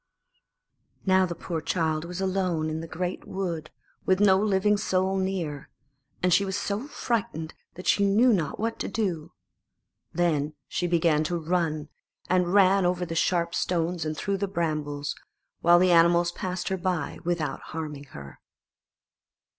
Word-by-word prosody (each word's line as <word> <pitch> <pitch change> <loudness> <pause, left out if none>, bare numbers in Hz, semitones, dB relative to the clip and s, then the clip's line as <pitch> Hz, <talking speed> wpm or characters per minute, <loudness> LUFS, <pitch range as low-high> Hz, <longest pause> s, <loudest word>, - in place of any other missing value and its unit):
Now 190 -1 +4
the 170 - -5
poor 165 -2 -4
child 160 -1 -1
was 180 +1 -6
alone 185 -5 0
in 155 - -3
the 165 - -7
great 180 +2 -4
wood, 170 -5 -3 0.3
with 185 0 +2
no 190 -2 +5
living 210 0 +2
soul 190 -2 0
near, 175 -7 -3 0.5
and 180 -1 +4
she 200 - +5
was 190 0 -2
so 205 +5 -3
frightened 195 - -2 0.2
that 180 - -9
she 200 - +3
knew 220 +5 +5
not 165 -7 -1
what 225 +1 -2
to - - -2
do. 180 -7 -2 0.8
Then 155 -4 0
she 175 - -1
began 165 -3 +2
to 175 +2 -1
run, 160 -2 -1 0.4
and 180 -1 +2
ran 195 0 +5
over 180 0 +1
the 165 - -5
sharp 170 0 +1
stones 170 -1 0
and 155 -1 -3
through 200 +3 -1
the 200 +1 -1
brambles, 150 -5 -2 0.5
while 175 +1 +6
the 180 +1 +4
animals 170 +1 +5
passed 180 +1 -4
her 190 - -1
by 180 -5 -2
without 170 -3 -1
harming 150 -3 -6
her. 70 - -11
175 Hz, 155 wpm, -27 LUFS, 160-190 Hz, 0.8 s, while